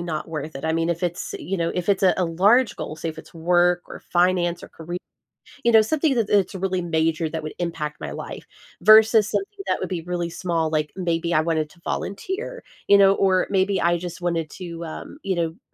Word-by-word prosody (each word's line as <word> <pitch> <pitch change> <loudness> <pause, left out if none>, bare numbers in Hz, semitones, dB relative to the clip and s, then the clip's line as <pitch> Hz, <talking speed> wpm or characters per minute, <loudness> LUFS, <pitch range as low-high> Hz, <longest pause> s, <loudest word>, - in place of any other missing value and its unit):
not 165 -2 -4
worth 155 -1 -5
it. 135 - -7
I 160 - +1
mean, 165 0 0
if 170 +1 -2
it's, 175 +2 -3
you 195 +2 -3
know, 170 -1 -1
if 180 0 -3
it's 195 -1 +3
a 185 - +5
a 185 - +1
large 200 +8 +3
goal, - - -5
say 160 +1 -5
if 160 - -7
it's - - -13
work 175 +1 +2
or - - -8
finance 175 -1 +1
or - - -10
caree 170 +2 -7 0.7
you 235 - +5
know, 220 - +8
something 290 +4 +1
that 230 -4 0
it 205 - +6
it's 195 0 -2
really 190 -1 -1
major 160 -1 0
that 160 0 -4
would 155 - -5
impact 155 -3 -4
my - - -5
life - - -7 0.4
versus 220 0 +7
something 405 +1 -3
that - - +1
would - - -3
be 180 - -2
really 175 -1 -3
small, 165 -3 -1
like, 155 -1 0
maybe 170 -2 -1
I 155 - +5
wanted 160 -2 0
to 175 - -21
volunteer, 385 - -4 0.3
you 200 - +8
know, 195 0 +7
or 190 -2 +2
maybe 195 0 +2
I 175 0 +2
just 175 0 -7
wanted 165 -3 -1
to, 170 -2 -7
um, 290 - -8
you 190 -1 -1
know, 170 -1 +1
n 205 - -26
175 Hz, 235 wpm, -23 LUFS, 165-195 Hz, 0.7 s, know